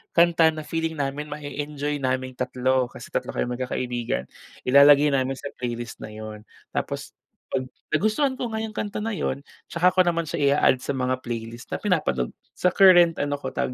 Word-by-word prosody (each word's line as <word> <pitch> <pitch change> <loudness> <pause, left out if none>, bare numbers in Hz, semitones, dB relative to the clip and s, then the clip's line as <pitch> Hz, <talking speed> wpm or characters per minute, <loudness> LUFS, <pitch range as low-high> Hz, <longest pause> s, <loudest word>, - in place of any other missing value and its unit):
kanta 170 -1 +5
na 155 -1 -1
feeling 165 0 -2
namin 145 +1 -3
ma-e-enjoy 145 0 -4
naming 130 -1 -2
tatlo, 125 0 +1
kasi - - -12
tatlo - - -3
kaming 125 +1 -2
magkakaibigan, 125 - -2 0.4
ilalagay 140 +2 +7
namin 135 -1 0
sa 140 +1 -7
playlist 120 -1 -4
na - - -7
yun. 110 0 -8 0.3
Tapos - - -4 0.4
'pag 130 - -1 0.3
nagustuhan 240 - +1
ko - - -2
nga 220 - -2
yung 220 -1 -5
kanta 205 -1 -3
na 225 - -2
yun, 140 -7 -2 0.3
'tsaka 175 +2 +3
ko 185 - +5
naman 170 -1 +1
siya 165 +2 -4 0.2
i-a-add 130 - +4
sa 140 - -1
mga 130 0 0
playlist 115 0 -6
na - - 0
pinapanood 150 - 0 0.3
sa 180 - +3
current 175 -4 +7
ano 145 0 -1
ko, 130 - -3
tawag 125 - -1
140 Hz, 180 wpm, -24 LUFS, 125-165 Hz, 0.4 s, ilalagay